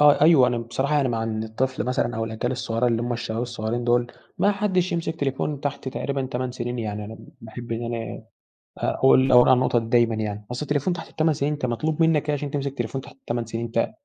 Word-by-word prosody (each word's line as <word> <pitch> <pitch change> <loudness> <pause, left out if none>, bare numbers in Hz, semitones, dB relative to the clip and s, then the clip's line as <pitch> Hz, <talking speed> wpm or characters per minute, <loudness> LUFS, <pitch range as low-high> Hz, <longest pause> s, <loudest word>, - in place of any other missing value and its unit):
آه 150 -1 +6
أيوه، 150 -4 +7
أنا 120 -1 0
بصراحة 120 +5 -1
يعني 140 -3 +2
مع 115 -2 -1
إن 110 -1 -2
الطفل 120 +4 -2
مثلًا 125 -2 0
أو 115 - -1
الأجيال 115 +3 -2
الصغيرة 120 -1 -1
اللي 115 -1 +1
هم 120 0 -1
الشباب 115 -1 -3
الصغيرين 120 0 -3
دول، 120 0 +3 0.3
ما 205 - +4
حدش 190 -3 0
يمسك 165 -1 -2
تليفون 140 +1 -1
تحت 145 -2 -3
تقريبًا 135 0 -2
8 130 0 -3
سنين، 120 0 -4
يعني 105 -2 -3
أنا 110 +2 -8 0.2
باحب 115 +1 -7
إن 115 +1 -3
أنا 115 -3 -6 0.5
أقول 130 0 +4
أقول 125 -1 +7
على 130 - +8
النقطة 125 -1 +2
دي 115 - -6
دايمًا 115 -1 +3
يعني. 105 -1 -4
أصل 125 - -4
التليفون 145 +4 0
تحت 175 - -7
ال8 160 0 +1
سنين 145 +1 0
أنت 145 -3 -3
مطلوب 150 +7 -1
منك 155 -2 +3
إيه - - +3
عشان 145 0 -4
تمسك 140 -2 -1
التليفون 135 -1 -3
تحت - - -14
ال8 120 -3 -3
سنين؟ 115 +1 -4
ت - - +1
125 Hz, 225 wpm, -24 LUFS, 115-145 Hz, 0.5 s, على